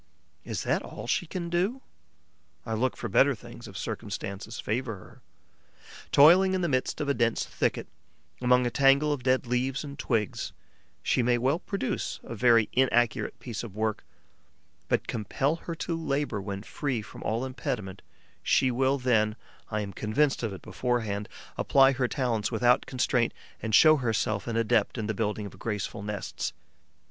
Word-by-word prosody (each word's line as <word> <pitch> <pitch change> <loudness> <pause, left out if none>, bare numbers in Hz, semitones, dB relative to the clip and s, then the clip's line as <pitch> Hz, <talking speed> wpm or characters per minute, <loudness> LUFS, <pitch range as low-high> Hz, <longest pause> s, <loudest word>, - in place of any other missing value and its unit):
Is - - -4
that - - +1
all - - -8
she 175 - 0
can 170 +1 -4
do? 190 +10 0 0.8
I 110 - -3
look 125 +3 0
for - - -4
better - - +4
things - - -11
if - - -9
circumstances 100 +3 -5
favour 115 +1 -2
her. 90 - -15 0.9
Toiling 185 +6 +7
in 185 - 0
the 175 - +1
midst 130 -1 0
of 150 - -2
a 140 - +3
dense 115 -3 +1
thicket, - - -1 0.6
among 125 0 +4
a 120 - 0
tangle 140 +3 +4
of 140 - -4
dead 130 +1 +2
leaves 125 +3 -1
and 140 -1 -8
twigs, 110 -5 -1 0.5
she - - +2
may 120 0 +3
well 135 +7 +1
produce 195 -8 -3
a - - -7
very 115 -1 +4
inaccurate 120 -3 +2
piece 115 -4 -5
of 110 -5 -8
work; 110 -1 -1 0.8
but - - 0
compel 135 +7 -1
her 170 0 -6
to 165 +1 -3
labour 140 -9 -1
when 100 0 -5
free 130 -3 -3
from - - -11
all 115 +4 -1
impediment: 125 -8 -4 0.4
she 130 - +3
will 130 +3 +2
then 110 -5 +2 0.3
I 105 -1 -1
am 100 -1 -5
convinced 135 +9 +1
of 115 -3 -2
it 95 - -9
beforehand 110 -5 -2 0.3
apply 135 -1 +5
her 130 -2 0
talents 120 -6 -1
without 120 +2 +3
constraint 125 -2 +1 0.3
and 110 -2 +1
show 155 -1 +7
herself 110 -4 -1
an 115 -1 -1
adept 115 0 +2
in 110 - -2
the 110 - -1
building 105 0 -2
of 100 - -10
graceful 105 -2 -3
nests. 105 -1 -4
125 Hz, 170 wpm, -28 LUFS, 110-135 Hz, 0.9 s, Toiling